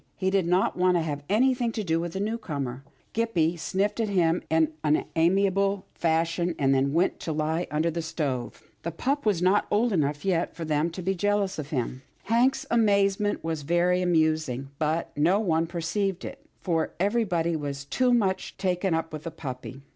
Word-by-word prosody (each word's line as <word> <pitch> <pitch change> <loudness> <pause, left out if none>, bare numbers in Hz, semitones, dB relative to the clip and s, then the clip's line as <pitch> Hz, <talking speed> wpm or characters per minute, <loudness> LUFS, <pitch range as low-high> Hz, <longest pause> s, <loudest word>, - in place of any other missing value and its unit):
He 190 0 0
did 190 -3 +2
not 180 +2 +2
want 180 0 +3
to 165 - 0
have 145 -2 -4
anything 245 +2 +2
to 220 - -2
do 165 -3 +1
with 170 0 -4
the 190 - -3
newcomer. 145 - -3 0.3
Gippie 180 -8 +1
sniffed 195 +6 -1
at 225 -2 0
him 175 -3 +2
in 160 -1 +2
an 150 0 +2
unamiable 195 +3 +2
fashion, 165 +1 0
and 135 -1 +3
then 135 +1 +2
went 170 +5 +1
to 165 - -4
lie 160 +3 -1
under 155 +3 0
the 170 +1 -3
stove. 140 -6 -3 0.2
The 170 - -3
pup 265 - -1
was 185 -5 +2
not 190 +3 +3
old 225 +2 +2
enough 150 -1 0
yet 180 -3 0
for 165 - -5
them 155 +1 +1
to 175 +2 -7
be 190 +2 +1
jealous 200 -1 0
of 145 -1 -5
him. 130 -2 -2 0.2
Hank's 240 +5 +2
amazement 205 -2 +2
was 160 -2 -2
very 175 +4 +2
amusing, 155 -6 +1
but 160 +1 -1
no 170 +7 +3
one 165 -5 +1
perceived 175 +3 -2
it, - - -8 0.2
for 165 -3 -1
everybody 185 -5 +1
was 140 -2 -4
too 250 - +1
much 195 -6 0
taken 185 -2 0
up 165 0 -3
with 155 - -5
the 165 - -5
puppy. 135 -3 -7
170 Hz, 185 wpm, -26 LUFS, 155-195 Hz, 0.3 s, want